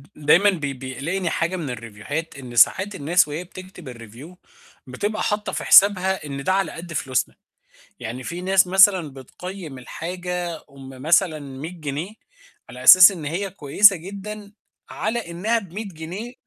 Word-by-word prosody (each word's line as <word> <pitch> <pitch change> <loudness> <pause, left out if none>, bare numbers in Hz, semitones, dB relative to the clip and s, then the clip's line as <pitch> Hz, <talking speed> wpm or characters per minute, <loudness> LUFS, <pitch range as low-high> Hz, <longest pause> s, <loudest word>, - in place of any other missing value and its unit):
دايمًا 165 +7 +4
بي 145 -7 -3
بيقلقني 140 +8 -4
حاجة 170 +3 -2
من 160 -6 -5
الريفوهات 120 +7 -6
إن 120 -2 -10
ساعات 190 - +3
الناس 160 +2 +2
وهي 155 +4 -5
بتكتب 180 -4 -12
الReview 120 +10 -13 0.5
بتبقى 205 +12 -3
حاطة 210 0 -2
في - - -4
حسابها 190 -3 +5
إن 140 -1 -6
ده 185 - +1
على 195 0 0
قد 170 0 -9
فلوسنا، 130 -3 -2 0.7
يعني 120 +4 -6
في 175 0 -6
ناس 190 0 +3
مثلًا 190 -3 +4
بتقيّم 160 +2 -9
الحاجة 175 +4 -5
أُم 135 -1 -13
مثلًا 165 0 +2
100 140 +3 -8
جنيه، 155 +7 -5 0.6
على 125 +1 -10
أساس 185 +6 +10
إن 170 -6 -8
هي 185 +6 -3
كويسة 195 +4 +4
جدًا 200 +4 -9 0.4
على 215 -3 -3
إنها 215 +7 0
ب100 200 +2 -7
جنيه 185 +7 -8
175 Hz, 150 wpm, -22 LUFS, 140-190 Hz, 0.7 s, أساس